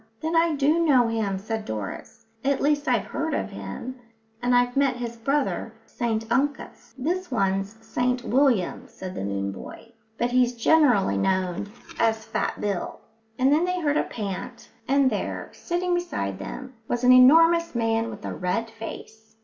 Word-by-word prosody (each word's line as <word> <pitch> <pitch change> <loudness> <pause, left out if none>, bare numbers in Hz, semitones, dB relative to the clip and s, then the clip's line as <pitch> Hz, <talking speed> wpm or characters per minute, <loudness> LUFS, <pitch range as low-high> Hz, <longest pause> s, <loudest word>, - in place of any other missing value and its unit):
"Then 320 +1 -2
I 330 -1 +3
do 300 +4 +3
know 260 -7 +4
him," 215 -4 -1
said 220 +2 -4
Doris. 110 - -6 0.2
"At 275 0 +1
least, 290 +1 +1
I've 240 -6 +2
heard 295 +8 -2
of - - -3
him, 100 - -7 0.4
and 245 0 +2
I've 245 0 +2
met 275 -2 +2
his 240 -1 -5
brother, 275 +5 -1
St 225 -2 -2
Uncus." 270 -2 -2
"This 355 +8 -2
one's 195 -3 -1
St 250 +2 0
William," 245 -6 +1
said 185 -1 -8
the - - -5
moon 100 0 -2
boy, 225 - -10 0.3
"but 240 +1 0
he's 250 -1 +3
generally 235 - +3
known 185 - 0 0.3
as 220 -1 +1
Fat - - -2
Bill." 200 -4 -3 0.4
And 265 +2 +4
then 310 +3 +3
they 360 0 0
heard 295 -3 +1
a - - +2
pant, 210 +3 -6 0.2
and 275 0 +4
there, - - -4
sitting 355 +1 -2
beside 100 - -2
them, 260 - -7
was 240 0 -2
an 250 - +7
enormous 330 +6 +6
man 225 0 +1
with 210 -2 -9
a - - -3
red 225 +6 -2
face. 220 0 -10
245 Hz, 165 wpm, -25 LUFS, 210-280 Hz, 0.4 s, an